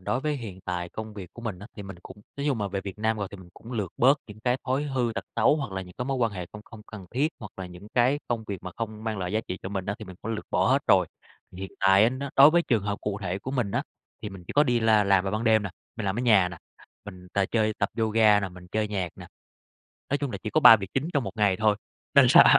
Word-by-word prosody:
đối 125 +7 -1
với 150 0 -1
hiện 105 -8 -8
tại 90 -1 -4
công 110 +2 -7
việc 95 -4 -8
của 120 - -11
mình 105 -6 -4
á, 100 - -10
thì 105 - -6
mình 95 -1 -9
cũng 100 +2 -12 0.2
nói 140 +1 -3
chung 135 -5 +1
mà 100 -1 -1
về 100 0 -3
Việt 100 +1 -8
Nam 110 +1 +1
rồi 100 -2 -3
thì - - -9
mình 95 -2 -13
cũng 115 - -11
lược 105 -7 -3
bớt 135 +4 +5
những 105 -1 -12
cái 125 +2 +1
thói 130 +2 0
hư 130 -5 -1
tật - - -4
xấu 115 +7 +4
hoặc 135 -9 -4
là 95 0 -3
những 90 -1 -13
cái 125 - -1
mối 135 +1 -1
quan 115 -4 +1
hệ 90 -3 -5
không 105 - -8
không 110 -1 -13
cần 100 -5 -10
thiết. 140 +5 +1
Hoặc 105 -3 -9
là 95 - -6
những 90 +3 -12
cái 125 +4 +3
công 115 -2 -2
việc 100 -3 -5
mà 90 - -6
không 110 -1 -5
mang 110 -2 -2
lại 90 0 -3
giá 110 - +1
trị 90 - -4
cho - - -4
mình 95 -2 -4
á, 100 - -1
thì 110 - -8
mình 95 -2 -11
cũng 115 - -4
lược 110 - -5
bỏ - - +2
hết - - +5
rồi. - - +5 0.5
Hiện 95 +1 -7
tại 95 +1 +6
á - - +5
nó 135 +2 -5
đối 140 +2 +9
với 170 +2 +3
trường 115 - +1
hợp 100 0 -3
cụ 105 -1 -3
thể 90 0 -2
của 125 - -6
mình 125 -7 -1
á, 120 +5 0 0.4
thì 105 - -3
mình 95 -3 -11
chỉ - - -6
có 145 - +5
đi 120 -4 +2
la 110 -2 +4
làm 100 -1 +3
vào 95 - -1
ban 110 +2 -1
đêm 110 -2 +4
nè, 100 - -4 0.3
mình 110 -3 -3
làm 95 - -1
ở - - -1
nhà 105 -7 +5
nè, 85 -2 -9 0.5
mình 90 -3 -11
t - - -1
chơi 110 -2 +2
tập - - +1
yoga 110 -2 +4
nè, 100 - -2
mình 90 0 -13
chơi 110 0 0
nhạc 95 -4 -2
nè. - - -10 0.8
Nói 140 - +1
chung 140 -2 -2
là - - -5
chỉ 110 - -3
có 155 - +2
3 115 - +10
việc 95 -2 -7
chính 135 +4 0
trong 140 -4 +1
một - - -6
ngày 100 -3 +3
thôi. 105 -1 +2 0.4
Nên - - +8
là - - +9
105 Hz, 310 wpm, -26 LUFS, 95-120 Hz, 0.8 s, 3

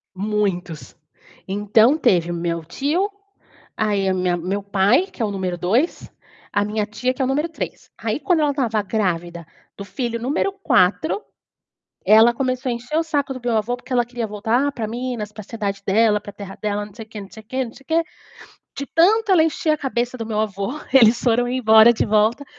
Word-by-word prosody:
Muitos. 190 -6 -3 0.5
Então 210 +7 +3
teve 175 - +2
o - - -2
meu 170 -1 -3
tio, 305 - -1 0.7
aí 205 -3 0
a 190 - +1
minha 180 -1 0
meu 190 +4 -3
pai, 200 - +2
que 260 - -7
é - - +2
o 210 - -1
número 185 -3 -3
2, 230 - 0 0.4
a 205 - +1
minha 210 0 -2
tia, 220 +4 -2
que 270 - -3
é - - +3
o 255 - -1
número 300 +5 0
3. 325 - -7
Aí, - - -2
quando 350 -4 +2
ela 295 - +2
estava 235 -7 0
grávida 175 -5 -2 0.3
do 200 - -7
filho 235 +4 -4
número 290 +10 0
4. 305 - +1 0.8
Ela 220 +3 +6
começou 255 +1 -2
a 240 - 0
encher 245 +6 -4
o 330 - +2
saco 290 -4 -1
do 255 - -7
meu 240 -1 0
avô 240 +3 -1
porque 250 - -8
ela 245 - +3
queria 240 -1 -4
voltar 225 +7 0
para 225 -4 -4
Minas, 235 -3 -4
para 215 - -14
a 195 - -14
cidade 200 -3 -4
dela, 210 +1 +3
para 205 - -10
a - - -33
terra 195 -1 -9
dela, 205 -1 -2
não 205 - -15
sei 225 - -9
quê, 215 -1 -9
não 195 - -12
sei 220 - -11
quê, 260 +4 -2
não 230 - -10
sei 275 - -17
quê. 330 +1 +2 0.7
De 280 - -4
tanto 415 +8 +3
ela 335 - +6
encheu 320 0 0
a 305 - +1
cabeça 250 -3 -2
do 225 - -4
meu 215 -1 -1
avô, 210 +7 -3
que 270 - +4
eles 230 0 +5
foram 245 0 +2
embora 230 -2 +6
de 225 - 0
volta 215 +5 +2
225 Hz, 215 wpm, -21 LUFS, 200-260 Hz, 0.8 s, Ela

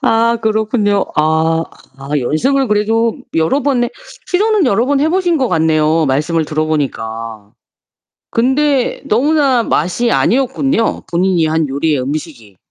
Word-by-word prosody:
아 230 +1 +2
그렇군요. 215 -2 0
아. 160 +1 +1 0.3
아 135 - -10
연습을 260 - 0
그래도 220 +2 +1 0.2
여러 165 - +1
번의 245 -3 0 0.4
시도는 410 -1 +1
여러 230 0 +2
번 280 +1 +1
해 305 - +2
보신 350 -1 +1
것 260 -3 0
같네요. 160 -2 +2
말씀을 155 +5 0
들어보니까. 115 -9 -3 0.8
근데 265 +2 +1
너무나 270 +1 +2
맛이 220 +7 0
아니었군요? 265 -1 0
본인이 175 -1 +1
한 160 0 0
요리의 140 +1 0
음식이. 130 - -6
205 Hz, 285 characters per minute, -15 LUFS, 155-260 Hz, 0.8 s, 아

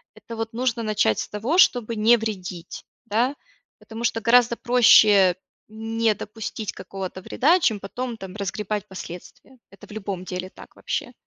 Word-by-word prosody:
это 230 -1 -10
вот 225 +1 -4
нужно 240 -1 -1
начать 210 - +1
с - - -3
того, 230 - -2
чтобы 240 -10 +3
не 220 +3 +5
вредить, 185 -6 -6 0.2
да. 235 +6 0 0.4
Потому 230 +1 -7
что 225 - 0
гораздо 235 +1 +4
проще 215 -7 +5 0.4
не 225 0 0
допустить 215 -1 -6
какого-то 185 0 -7
вреда, 310 - +2
чем 220 - +1
потом 235 +4 -5
там 190 -2 -9
разгребать 210 +1 -3
последствия, 190 +7 -11
это 195 - -15
в - - -17
любом 195 -3 -5
деле 185 0 -5
так - - -15
вообще. - - -4
220 Hz, 155 wpm, -23 LUFS, 195-235 Hz, 0.4 s, не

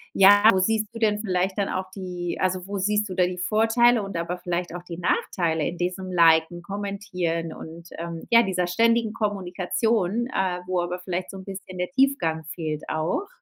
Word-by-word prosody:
ja, 205 +1 +7
wo 190 - +2
siehst 215 +3 +1
du 230 - -7
denn 210 -2 +2
vielleicht 190 -1 -1
dann 200 - +1
auch 185 0 -3
die 180 -2 -5
also, 185 -1 0
wo 200 - -3
siehst 210 +1 0
du - - -4
da 180 - +3
die 180 0 -4
Vorteile 225 +3 +3
und 195 -2 -7
aber 170 +2 -2
vielleicht 175 0 -3
auch 175 - -7
die 175 -1 -8
Nachteile 165 -3 0
in 175 - -5
diesem 185 +1 -3
Liken, 165 0 +4
Kommentieren 185 -4 -3
und, 170 +1 -10
ähm, 170 0 -5
ja, 235 0 +7
dieser 180 -2 -1
ständigen 230 +4 +2
Kommunikation, 205 +2 -1
äh, 185 -8 -1
wo 185 -1 0
aber 175 +1 -3
vielleicht 180 0 -4
so 195 - -8
‘n 190 - -9
bisschen 190 -1 -8
der 180 0 -3
Tiefgang 220 - +1
fehlt 155 -3 -4
auch? 160 - -1
185 Hz, 190 wpm, -25 LUFS, 175-205 Hz, -, ja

